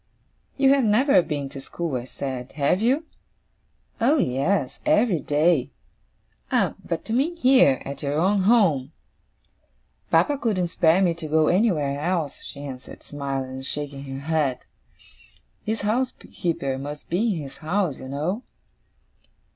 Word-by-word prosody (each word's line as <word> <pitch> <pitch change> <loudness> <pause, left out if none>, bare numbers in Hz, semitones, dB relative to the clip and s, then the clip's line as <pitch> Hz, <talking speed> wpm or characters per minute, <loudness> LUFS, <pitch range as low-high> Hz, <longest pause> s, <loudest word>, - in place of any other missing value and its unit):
'You 270 -1 +5
have 275 -2 +3
never 220 0 +4
been 145 -4 -3
to 135 - -8
school,' 165 +1 -4
I 120 -1 -3
said, 130 0 -6
'have 150 +6 +1
you?' 265 +8 +2 1.0
'Oh 275 +7 +4
yes! 140 - 0
Every 210 -7 +3
day.' 145 -1 +2 0.8
'Ah, - - +2
but 165 - -4
you 225 - -2
mean 290 +8 +1
here, 255 - +4
at 140 +1 -6
your 145 0 -1
own 195 +5 +3
home?' 185 - +3 1.2
'Papa 290 -2 +3
couldn't 195 -9 0
spare 170 +2 +3
me 175 -2 +3
to 165 -1 -7
go 155 0 +3
anywhere 165 -8 +1
else,' 165 -2 -2
she 140 - -9
answered, 130 -2 -9
smiling 135 -2 -4
and 130 0 -7
shaking 145 -1 -5
her 135 0 -6
head. 150 -4 -1 1.0
'His 220 0 -2
housekeeper 200 - -2
must 145 +2 -7
be 205 +4 +1
in 160 - -4
his 135 - -10
house, 170 -2 -1
you - - -8
know. 155 - -2
160 Hz, 145 wpm, -24 LUFS, 140-210 Hz, 1.2 s, You